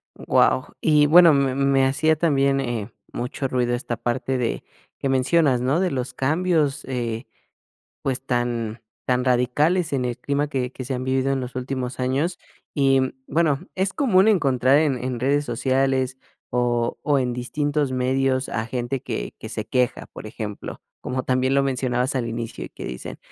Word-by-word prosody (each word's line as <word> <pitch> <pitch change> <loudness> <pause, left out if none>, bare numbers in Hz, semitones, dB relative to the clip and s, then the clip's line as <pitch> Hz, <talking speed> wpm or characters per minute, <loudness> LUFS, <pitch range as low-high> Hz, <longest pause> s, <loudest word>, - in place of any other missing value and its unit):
Guau, 130 +2 +2
y 150 -2 +4
bueno, 165 +1 +8
me 135 -2 +2
me 135 -1 +3
hacía 155 +4 +2
también, 140 -4 +2
eh, 120 -4 -3 0.2
mucho 130 +3 -3
ruido 125 -2 0
esta 120 -1 -2
parte 130 +2 -2
de 120 -2 -2 0.3
que - - -2
mencionas, 135 0 +3
¿no? 135 +7 +1
De 185 -2 +1
los 130 -1 -3
cambios, 155 0 +1
eh, 120 -2 -3 0.8
pues, 135 0 -2
tan 120 -3 -1 0.3
tan 125 0 +2
radicales 145 +7 +2
en 130 -2 0
el 120 - -3
clima 145 +1 -1
que 130 -3 -2
que 130 - -7
se 130 +2 -3
han 125 0 -3
vivido 130 +1 +1
en 135 - 0
los 125 0 -6
últimos 130 0 -3
años. 140 +8 0 0.3
Y, 135 -2 +3
mm, 130 0 -1
bueno, 155 -2 +1
es 190 +1 0
común 220 -9 +4
encontrar 140 - +3
en 140 -6 +1
en 125 -1 -2
redes 140 +3 +2
sociales, 130 +1 0 0.3
o 120 -1 0
o, 145 -2 +2
en 125 -1 0
distintos 145 +3 -1
medios 130 +1 +1
a 110 0 -2
gente 125 +2 -3
que - - -4
que - - -8
se - - -4
queja, 125 -1 0
por - - -9
ejemplo, 105 -1 -6 0.2
como 130 +1 -3
también 130 +1 +1
lo 140 - +4
mencionabas 130 0 0
al 125 -3 -1
inicio, 115 0 -5
y - - -10
que - - -10
dicen: 60 - -6
130 Hz, 175 wpm, -23 LUFS, 125-140 Hz, 0.8 s, bueno